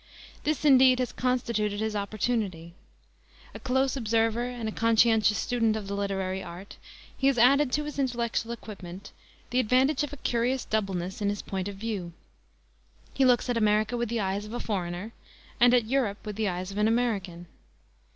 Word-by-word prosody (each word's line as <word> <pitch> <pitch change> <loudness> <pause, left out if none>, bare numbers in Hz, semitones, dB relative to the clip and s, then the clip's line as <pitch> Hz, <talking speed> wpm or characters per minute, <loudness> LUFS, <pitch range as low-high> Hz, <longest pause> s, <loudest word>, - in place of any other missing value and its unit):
This, 305 -1 -1
indeed, 260 -2 +6
has 250 -1 -1
constituted 235 -5 -1
his 220 0 -2
opportunity. 200 -5 -2 0.8
A - - -8
close 265 0 0
observer 225 -1 +1
and 245 -2 -5
a - - -2
conscientious 225 -2 +3
student 230 -3 +1
of 210 -2 -5
the 200 - -4
literary 195 -1 -2
art, 180 +2 -10 0.4
he 270 - +1
has 275 -2 +3
added 270 +3 +5
to 300 - +1
his 295 -1 -6
intellectual 235 -3 -1
equipment 200 -5 -9 0.4
the 250 - +2
advantage 255 +4 +3
of 295 - -4
a 290 - -8
curious 245 +1 0
doubleness 195 -2 -2
in 200 - +1
his 205 0 -3
point 190 -1 -4
of 200 - -6
view. 195 -5 -4 1.0
He 270 - +2
looks 250 0 +3
at 245 -1 0
America 215 +1 +2
with 240 -2 -2
the 235 0 -1
eyes 195 +1 -2
of 215 - -9
a 240 - -3
foreigner 185 +1 -4 0.5
and 245 0 +6
at 245 -2 +3
Europe 230 -4 -1
with 210 -1 -5
the 215 0 -1
eyes 180 +1 -4
of 200 - -4
an 210 - +3
American. 205 -7 -1
225 Hz, 180 wpm, -27 LUFS, 200-245 Hz, 1.0 s, indeed